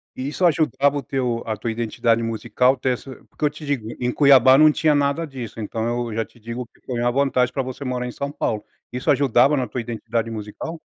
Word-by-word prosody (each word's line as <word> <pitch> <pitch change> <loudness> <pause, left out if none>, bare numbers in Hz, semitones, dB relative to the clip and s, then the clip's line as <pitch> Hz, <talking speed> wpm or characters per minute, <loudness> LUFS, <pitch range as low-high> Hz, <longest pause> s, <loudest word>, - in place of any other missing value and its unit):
Isso 145 +7 -1
ajudava 145 -3 +2
o 140 - -4
teu 125 -3 -2
a 110 -1 -2
tua 115 +2 -3
identidade 115 0 0
musical 125 +3 +1
ter 130 0 -2
essa 130 +2 -8
porque 150 - -3
eu - - +4
te 150 +1 -11
digo, 130 -7 -2
em 125 0 0
Cuiabá 135 -2 +6
não 155 0 +7
tinha 150 -1 +2
nada 140 +3 +1
disso, 125 -6 -8
então 115 +3 -2
eu - - -6
já 115 - -1
te 120 - -23
digo 115 +2 -6
que - - -30
foi 120 -2 -4
uma 120 0 +2
vantagem 130 -2 +1
pra 135 - 0
você 130 +2 -7
morar 125 -1 -2
em - - -5
São 140 +3 -4
Paulo. 110 -6 -2 0.3
Isso 125 +3 0
ajudava 135 +1 +4
na 130 -3 -1
tua 125 - -4
identidade 115 0 -3
musical? 110 +10 -6
125 Hz, 225 wpm, -22 LUFS, 115-140 Hz, 0.3 s, não